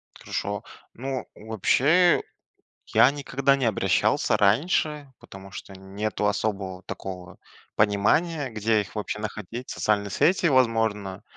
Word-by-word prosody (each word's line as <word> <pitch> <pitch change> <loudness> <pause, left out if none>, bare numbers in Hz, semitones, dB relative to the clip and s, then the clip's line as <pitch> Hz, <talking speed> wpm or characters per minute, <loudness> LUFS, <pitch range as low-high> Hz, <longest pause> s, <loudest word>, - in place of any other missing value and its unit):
Хорошо. - - -4 0.3
Ну, 130 +1 -4
вообще, 140 - +3 0.6
я 130 - +5
никогда 140 -1 +1
не 135 - -2
обращался 110 - +2
раньше, 145 - +1
потому 95 0 -12
что 95 - -9
нету 100 +2 -3
особого, 100 -2 -2
такого, 90 -3 -8 0.4
понимания, 130 +9 +2
где 110 0 +1
их 100 - -7
вообще 105 -1 -4
находить. 110 +3 -6
Социальные 100 -1 0
сети, 170 - +2
возможно. 115 - +1
110 Hz, 110 wpm, -25 LUFS, 100-135 Hz, 0.6 s, я